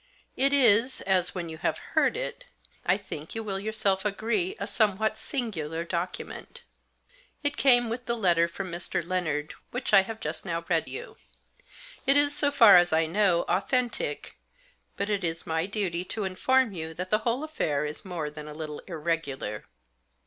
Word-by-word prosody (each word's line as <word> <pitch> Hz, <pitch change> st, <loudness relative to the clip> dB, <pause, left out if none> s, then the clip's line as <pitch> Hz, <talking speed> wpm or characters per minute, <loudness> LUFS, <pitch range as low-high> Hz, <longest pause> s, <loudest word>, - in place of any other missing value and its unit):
It 275 Hz, +1 st, +3 dB
is, 250 Hz, -2 st, +4 dB
as, 185 Hz, -2 st, +1 dB
when 175 Hz, -2 st, -3 dB
you 160 Hz, -1 st, -8 dB
have -, -, 0 dB, 0.2 s
heard -, -, +3 dB
it, -, -, -5 dB, 0.4 s
I 180 Hz, +2 st, +4 dB
think 165 Hz, -5 st, -8 dB
you 225 Hz, -, -3 dB
will 195 Hz, -2 st, -3 dB
yourself 200 Hz, -2 st, 0 dB
agree, 210 Hz, -2 st, -1 dB
a 200 Hz, -, -2 dB
somewhat 215 Hz, 0 st, +1 dB
singular 170 Hz, -, -3 dB
document. 180 Hz, -, -5 dB, 0.8 s
It 290 Hz, 0 st, 0 dB
came 245 Hz, -4 st, +5 dB
with 245 Hz, +3 st, -5 dB
the 235 Hz, 0 st, 0 dB
letter 170 Hz, -5 st, +3 dB
from 185 Hz, +2 st, -6 dB
Mr. 170 Hz, -1 st, -3 dB
Lennard 155 Hz, -5 st, -1 dB, 0.2 s
which 245 Hz, -2 st, -4 dB
I 195 Hz, -, +9 dB
have 225 Hz, +3 st, -7 dB
just 155 Hz, -2 st, -4 dB
now 170 Hz, -2 st, -3 dB
read 165 Hz, -2 st, +1 dB
you. -, -, -8 dB, 0.9 s
It 275 Hz, +1 st, +6 dB
is, 290 Hz, 0 st, +4 dB
so 290 Hz, -1 st, +3 dB
far 230 Hz, -9 st, +8 dB
as 175 Hz, 0 st, +4 dB
I 160 Hz, +1 st, +3 dB
know, 180 Hz, 0 st, +2 dB
authentic; 250 Hz, -, -1 dB, 0.6 s
but 200 Hz, -, -1 dB
it 205 Hz, -2 st, -1 dB
is 165 Hz, -1 st, -3 dB
my 160 Hz, +2 st, -1 dB
duty 190 Hz, -4 st, -2 dB
to 215 Hz, +3 st, -4 dB
inform 230 Hz, +5 st, +2 dB
you 160 Hz, -2 st, -6 dB
that 180 Hz, +2 st, -5 dB
the 215 Hz, -, +4 dB
whole 235 Hz, +5 st, -1 dB
affair 150 Hz, -, -1 dB
is 150 Hz, 0 st, -5 dB
more 170 Hz, -5 st, -4 dB
than 150 Hz, 0 st, -9 dB
a 150 Hz, -, -8 dB
little 155 Hz, -1 st, -6 dB
irregular. 155 Hz, -, -3 dB
190 Hz, 175 wpm, -27 LUFS, 165-230 Hz, 0.9 s, I